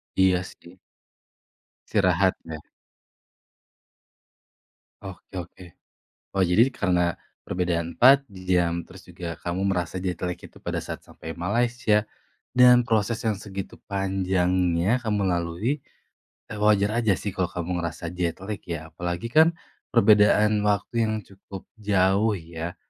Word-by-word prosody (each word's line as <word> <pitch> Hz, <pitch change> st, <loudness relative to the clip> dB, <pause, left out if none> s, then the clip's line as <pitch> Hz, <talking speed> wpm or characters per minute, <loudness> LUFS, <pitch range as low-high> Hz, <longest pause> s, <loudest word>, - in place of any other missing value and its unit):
Iya 95 Hz, -1 st, +3 dB
sih. 90 Hz, -1 st, -14 dB, 1.1 s
Istirahat 95 Hz, -2 st, +3 dB
ya. 80 Hz, -1 st, -7 dB, 2.4 s
Oke 95 Hz, 0 st, -10 dB
oke. 90 Hz, 0 st, -8 dB, 0.7 s
Oh 95 Hz, -, +3 dB
jadi 95 Hz, +8 st, +4 dB
karena 90 Hz, -9 st, 0 dB, 0.3 s
perbedaan 85 Hz, -2 st, -1 dB
4 135 Hz, +2 st, +6 dB
jam 90 Hz, -4 st, 0 dB
terus 95 Hz, +2 st, -15 dB
juga 85 Hz, -1 st, -7 dB
kamu 90 Hz, +2 st, -3 dB
merasa 90 Hz, -1 st, -2 dB
jet 90 Hz, -2 st, -2 dB
lag 90 Hz, -1 st, -2 dB
itu 90 Hz, +1 st, -15 dB
pada -, -, -4 dB
saat -, -, -6 dB
sampai 80 Hz, -, -9 dB
Malaysia, 110 Hz, +3 st, +1 dB, 0.5 s
dan 125 Hz, 0 st, +6 dB
proses 115 Hz, 0 st, 0 dB
yang 110 Hz, -2 st, +1 dB
segitu 100 Hz, -2 st, -7 dB
panjangnya 95 Hz, 0 st, +1 dB
kamu 105 Hz, -4 st, -1 dB
lalui, 85 Hz, -, -1 dB, 0.7 s
eee, 105 Hz, -, -6 dB
wajar 105 Hz, +1 st, +3 dB
aja 110 Hz, -5 st, +2 dB
sih 100 Hz, -, -4 dB
kalau 90 Hz, 0 st, -1 dB
kamu 90 Hz, 0 st, -3 dB
ngerasa 85 Hz, 0 st, -4 dB
jet 90 Hz, -2 st, -2 dB
lag 105 Hz, +1 st, -4 dB
ya, 80 Hz, -2 st, -6 dB
apalagi 85 Hz, +5 st, -4 dB
kan, 160 Hz, +3 st, +5 dB, 0.4 s
perbedaan 105 Hz, -1 st, +5 dB
waktu 110 Hz, +3 st, 0 dB
yang 110 Hz, -, -1 dB
cukup 95 Hz, -1 st, -11 dB, 0.2 s
jauh 100 Hz, +1 st, +2 dB
ya, 85 Hz, 0 st, -7 dB
95 Hz, 125 wpm, -25 LUFS, 90-105 Hz, 2.4 s, 4